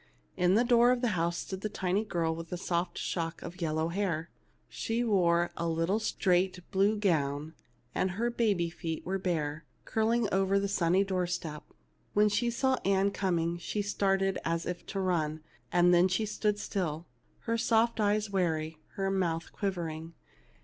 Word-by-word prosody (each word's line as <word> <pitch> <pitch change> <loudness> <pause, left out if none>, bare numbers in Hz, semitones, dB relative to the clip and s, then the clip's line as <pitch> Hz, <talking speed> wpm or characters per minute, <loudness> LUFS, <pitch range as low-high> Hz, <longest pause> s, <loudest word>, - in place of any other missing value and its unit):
In 180 +1 +3
the 230 - +5
door 240 0 +5
of 250 -1 +1
the 245 - +2
house 170 -3 0
stood 190 0 -5
a 215 - -1
tiny 190 0 0
girl 170 -6 -1
with 165 0 -8
a 180 - -2
soft 175 -1 -2
shock 165 -2 -3
of 175 +2 -8
yellow 160 0 0
hair. 170 -3 -2 0.4
She 230 +2 -2
wore 175 -6 +3
a 170 0 -1
little 165 +6 +1
straight 185 -4 +1
blue 200 +2 +3
gown, 155 -6 0 0.4
and 190 - +1
her 240 +2 +1
baby 200 -8 +1
feet 165 -1 -5
were 195 +1 -1
bare, 160 -4 -2 0.2
curling 225 +1 +1
over 195 +1 +3
the 200 - 0
sunny 190 -1 +2
door 185 -2 -1
step. 160 -3 -4 0.5
When 210 +1 +4
she 235 +3 +1
saw 260 +2 +1
Ann 195 0 +2
coming 175 -3 0
she 205 +4 -2
started 195 -1 +1
as 165 0 -1
if 180 -1 -5
to 195 - -3
run; 160 -5 0 0.3
then 175 0 +5
she 190 +4 0
stood 210 0 0
still, 175 -6 -3 0.4
her 230 - -1
soft 230 0 +2
eyes 210 0 +2
wary, 160 -4 -1 0.2
her 195 0 0
mouth 170 -4 -1
quiv 200 -2 -1
ering. 165 -1 -5
185 Hz, 170 wpm, -30 LUFS, 170-205 Hz, 0.5 s, the